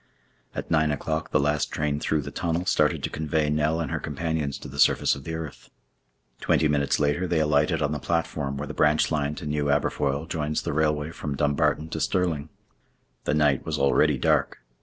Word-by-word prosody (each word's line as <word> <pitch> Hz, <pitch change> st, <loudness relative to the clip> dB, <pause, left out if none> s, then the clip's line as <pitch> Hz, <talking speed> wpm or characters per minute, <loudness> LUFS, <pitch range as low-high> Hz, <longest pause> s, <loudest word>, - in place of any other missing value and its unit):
At -, -, -5 dB
nine 80 Hz, -2 st, +3 dB
o'clock 80 Hz, +2 st, -2 dB
the 75 Hz, -, +2 dB
last 75 Hz, +1 st, +1 dB
train 75 Hz, -1 st, -1 dB
through 75 Hz, -1 st, 0 dB
the -, -, -7 dB
tunnel 85 Hz, +1 st, -2 dB
started 75 Hz, -5 st, +2 dB
to -, -, -1 dB
convey 75 Hz, -1 st, 0 dB
Nell 75 Hz, +2 st, +1 dB
and 80 Hz, -5 st, -3 dB
her -, -, -1 dB
companions 75 Hz, -1 st, -2 dB
to -, -, -9 dB
the 70 Hz, +2 st, -9 dB
surface -, -, +4 dB
of 70 Hz, -, -7 dB
the 80 Hz, -, -4 dB
earth. 80 Hz, -3 st, -8 dB, 0.7 s
Twenty 80 Hz, -, +2 dB
minutes 70 Hz, -1 st, +1 dB
later 75 Hz, +5 st, +1 dB
they 85 Hz, -2 st, +1 dB
alighted 75 Hz, -1 st, +2 dB
on 75 Hz, -, 0 dB
the 75 Hz, -, -2 dB
platform 75 Hz, -3 st, -2 dB
where 75 Hz, -, -3 dB
the 75 Hz, -, -7 dB
branch 75 Hz, +1 st, +3 dB
line 75 Hz, -1 st, 0 dB
to 75 Hz, -, -7 dB
New 75 Hz, 0 st, -1 dB
Aberfoyle 70 Hz, 0 st, 0 dB
joins 75 Hz, -2 st, -2 dB
the -, -, -2 dB
railway 75 Hz, 0 st, 0 dB
from 75 Hz, -3 st, -5 dB
Dumbarton 75 Hz, +2 st, +1 dB
to 80 Hz, -, -4 dB
Stirling. 80 Hz, -5 st, 0 dB, 0.8 s
The 75 Hz, -, +1 dB
night 75 Hz, -3 st, +2 dB
was -, -, -2 dB
already 70 Hz, 0 st, +3 dB
dark. -, -, +1 dB
75 Hz, 200 wpm, -25 LUFS, 75-80 Hz, 0.8 s, surface